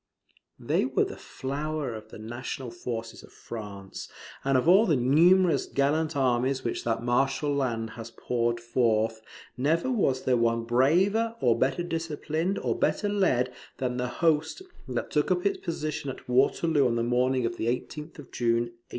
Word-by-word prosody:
] - - -37
They - - +3
were - - +1
the - - -7
flower 145 0 -4
of 110 0 -9
the - - -10
national 120 +3 -6
forces 115 -1 -6
of - - -16
France; 100 -4 -8 0.3
and 135 -1 +3
of 130 - 0
all 195 +6 +6
the 160 - +3
numerous 165 +8 +4
gallant 150 +3 0
armies 130 0 +1
which 115 - -2
that 115 0 -1
martial 135 +4 +1
land 115 -5 -1
has 115 +1 -8
poured 120 0 -1
forth, 115 -2 +1 0.4
never 160 - +1
was 135 - +1
there 125 -1 +2
one 115 0 +1
braver, 180 - +2
or 120 -2 +3
better 135 +7 0
disciplined, 165 +2 -2
or - - -1
better 205 - 0
led, 130 -12 +1 0.2
than 125 -1 -2
the 125 0 -1
host 160 - 0 0.2
that 125 -2 -3
took 150 -1 +1
up 180 0 +1
its 200 - +1
position 155 -4 -3
at 130 - -8
Waterloo 140 +3 +3
on 115 - 0
the 115 - 0
morning 125 +1 +1
of 115 0 -3
the 115 - -2
18th 150 +6 -4
of 145 - -12
June, 120 0 0
1815. 115 - -30
130 Hz, 175 wpm, -27 LUFS, 120-155 Hz, 0.4 s, all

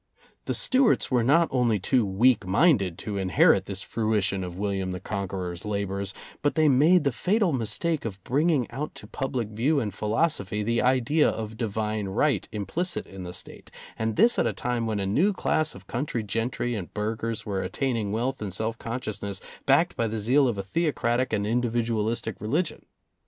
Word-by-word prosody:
The - - -1
Stuarts 255 - +2
were 125 -2 +3
not 165 +7 +4
only 120 -4 +2
too 120 +6 +2
weak 110 +4 +3
minded 100 - +3
to 100 0 -4
inherit 95 -1 +4
this 100 -1 -4
fruition 105 -4 0
of 90 -1 -6
William 95 -2 -2
the 90 - -5
Conqueror's 95 -3 -4
labors, 100 -1 -2 0.3
but 145 - +1
they 155 -1 +4
made 150 +6 +5
the 140 - +2
fatal 190 - +1
mistake 135 +7 -1
of 100 -4 -6
bringing 145 0 +2
out 150 +3 -5
to - - -9
public 130 -5 -3
view 130 +8 +1
and 105 -6 -3
philosophy 105 - 0
the 115 +2 +1
idea 130 +4 +3
of 110 0 -5
Divine 110 -2 -2
Right 125 +10 0
implicit 170 - -2
in 95 -1 -10
the 90 -1 -6
State, 90 - -9 0.3
and 110 0 -2
this 230 +6 +4
at - - +3
a - - -1
time 120 -2 -2
when 110 -2 -1
a 100 - -1
new 160 - +2
class 155 -4 0
of 95 0 -12
country 120 -2 -3
gentry 115 +3 -2
and 100 -6 -5
burghers 110 +1 -2
were 100 -2 -2
attaining 115 -7 -1
wealth 125 +4 -2
and 105 -2 -3
self 110 +4 -3
consciousness 110 -4 -4 0.3
backed 145 +6 +4
by 115 - 0
the 110 +1 -3
zeal 130 +6 +3
of 115 -4 -1
a 100 - -3
theocratic 130 - 0
and 105 -2 0
individual 115 -1 0
istic 110 -2 -2
religion. 155 - -2
115 Hz, 185 wpm, -26 LUFS, 100-135 Hz, 0.3 s, made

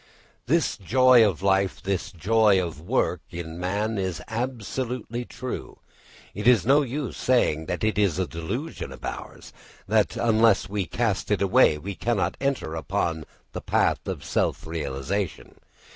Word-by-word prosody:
_ - - -29 0.4
This 165 -1 +1
joy 125 +4 +5
of 95 -4 0
life, 95 -1 +2
this 95 -2 -2
joy 105 +3 +3
of 85 -4 -4
work, 90 -3 0
in 85 -1 -7
man 100 +4 -1
is 95 -3 -2
absolutely 120 +1 -3
true. 130 +1 -6 0.6
It 105 +4 -3
is 120 -5 +5
no 140 +4 +5
use 140 0 -3
saying 80 -11 +1
that 90 - -3
it 110 -1 +1
is 100 -6 +2
a 95 - +1
delusion 85 - -5
of 65 - -9
ours; - - -7 0.3
that - - +2
unless 110 -3 +3
we 100 -2 -2
cast 115 -5 -1
it 105 - +2
away 100 -6 +4
we 100 +7 -6
cannot 115 +1 -1
enter 135 - -1
upon 80 -1 -2 0.3
the - - -5
path - - +1
of - - -4
self - - -1
realisation. 80 +4 -4
100 Hz, 155 wpm, -25 LUFS, 85-120 Hz, 0.6 s, joy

